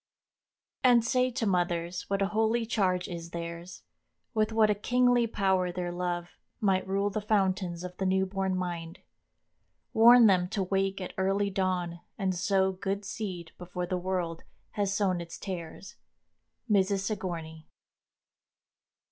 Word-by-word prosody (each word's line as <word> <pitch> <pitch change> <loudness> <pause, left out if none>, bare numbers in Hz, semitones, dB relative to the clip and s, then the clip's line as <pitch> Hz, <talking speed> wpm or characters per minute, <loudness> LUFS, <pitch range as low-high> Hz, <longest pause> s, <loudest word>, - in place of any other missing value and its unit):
] - - -65 0.3
"And 240 -3 +5
say 255 +2 +2
to 235 -2 -2
mothers 175 -2 -1
what 195 0 +1
a 195 - 0
holy 220 +2 +1
charge 185 -5 0
Is 170 -1 -6
theirs; 170 +1 -7 0.5
with 215 -1 +1
what 220 -1 +4
a - - +4
kingly 245 +3 +2
power 190 -4 +1
their 175 0 -3
love 175 -1 -4 0.2
Might 190 -3 +1
rule 200 +1 0
the 215 - -2
fountains 190 -4 0
of 180 0 -7
the 190 - 0
new 190 0 +2
born 190 0 -1
mind; 175 -1 -5 0.9
Warn 235 +1 +8
them 185 -4 +4
to 195 - -1
wake 195 +1 0
at 185 - -6
early 195 +1 +1
dawn 180 -3 -1 0.2
and 190 -2 0
sow 190 +1 +2
Good 195 +2 -3
seed 185 -6 -5
before 180 0 -4
the 185 - -2
world 180 -2 -2 0.3
has 205 -2 -1
sown 195 -3 +1
its 170 0 -8
tares." 185 +2 -7 0.7
—MRS. 200 -2 +2
SIGOURNEY. 170 -6 -5
190 Hz, 150 wpm, -29 LUFS, 180-205 Hz, 0.9 s, Warn